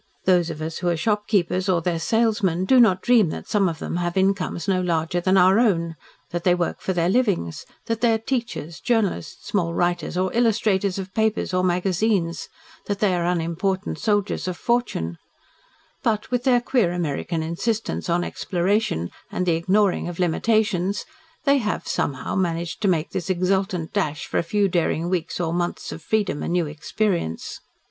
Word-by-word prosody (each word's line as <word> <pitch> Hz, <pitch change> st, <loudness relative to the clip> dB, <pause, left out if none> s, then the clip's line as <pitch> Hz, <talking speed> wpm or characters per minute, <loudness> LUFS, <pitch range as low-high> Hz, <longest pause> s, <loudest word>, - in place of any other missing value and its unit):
Those 180 Hz, -2 st, +3 dB
of 155 Hz, -1 st, -5 dB
us 160 Hz, 0 st, -4 dB
who 180 Hz, -, -2 dB
are 170 Hz, -, +1 dB
shopkeepers, 200 Hz, -1 st, 0 dB
or 180 Hz, -2 st, +3 dB
their 170 Hz, 0 st, -1 dB
salesmen, 210 Hz, -2 st, +1 dB
do 255 Hz, +6 st, +5 dB
not 200 Hz, -6 st, +4 dB
dream 230 Hz, -8 st, +4 dB
that -, -, -6 dB
some 200 Hz, -3 st, +2 dB
of 165 Hz, -, -5 dB
them 170 Hz, -, -4 dB
have 175 Hz, +1 st, -2 dB
incomes 190 Hz, -3 st, 0 dB
no 185 Hz, -2 st, +2 dB
larger 170 Hz, 0 st, 0 dB
than 185 Hz, +2 st, +3 dB
our 190 Hz, +3 st, +6 dB
own, 170 Hz, -8 st, +1 dB, 0.4 s
that 175 Hz, 0 st, -3 dB
they 180 Hz, -1 st, +4 dB
work 175 Hz, -1 st, -2 dB
for -, -, -1 dB
their 170 Hz, -2 st, +1 dB
livings, 195 Hz, -, 0 dB, 0.2 s
that 230 Hz, 0 st, -2 dB
they 240 Hz, -1 st, +4 dB
are 225 Hz, -, +3 dB
teachers 225 Hz, -, -4 dB
journalists, 220 Hz, -, -1 dB
small 170 Hz, -4 st, 0 dB
writers 175 Hz, -1 st, 0 dB
or 185 Hz, 0 st, 0 dB
illustrators 210 Hz, -5 st, +2 dB
of 190 Hz, -1 st, -6 dB
papers 220 Hz, -3 st, 0 dB
or 185 Hz, 0 st, +2 dB
magazines 180 Hz, 0 st, 0 dB, 0.4 s
that 205 Hz, -, -1 dB
they 200 Hz, -2 st, +2 dB
are 175 Hz, -1 st, 0 dB
unimportant 180 Hz, +3 st, -1 dB
soldiers 205 Hz, -3 st, 0 dB
of 180 Hz, -1 st, -3 dB
fortune, 235 Hz, -, -1 dB, 0.8 s
but, 215 Hz, 0 st, -1 dB
with 245 Hz, +1 st, 0 dB
their 245 Hz, -2 st, +4 dB
queer 240 Hz, -8 st, +1 dB
American 165 Hz, -1 st, -2 dB
insistence 205 Hz, +5 st, -2 dB
on 175 Hz, +1 st, +2 dB
exploration, 175 Hz, -, -1 dB, 0.2 s
and 180 Hz, -, -1 dB
the 175 Hz, -, +3 dB
ignoring 185 Hz, +4 st, +2 dB
of 175 Hz, -1 st, -6 dB
limitations, 200 Hz, +1 st, +1 dB, 0.4 s
they 280 Hz, -1 st, +4 dB
have, 210 Hz, -4 st, -2 dB
somehow, 135 Hz, -2 st, -2 dB
managed 170 Hz, -1 st, -1 dB
to 205 Hz, -, +2 dB
make 170 Hz, -3 st, +1 dB
this 185 Hz, 0 st, -4 dB
exultant 185 Hz, -1 st, 0 dB
dash 155 Hz, -8 st, -1 dB
for -, -, -1 dB
a -, -, +3 dB
few 200 Hz, +4 st, +1 dB
daring 170 Hz, -1 st, 0 dB
weeks 180 Hz, -2 st, -2 dB
or 165 Hz, -2 st, -1 dB
months 175 Hz, 0 st, -2 dB
of 165 Hz, -, -7 dB
freedom 200 Hz, -3 st, 0 dB
and -, -, -2 dB
new 175 Hz, -2 st, +2 dB
experience. 155 Hz, -, -2 dB
185 Hz, 180 wpm, -23 LUFS, 170-210 Hz, 0.8 s, our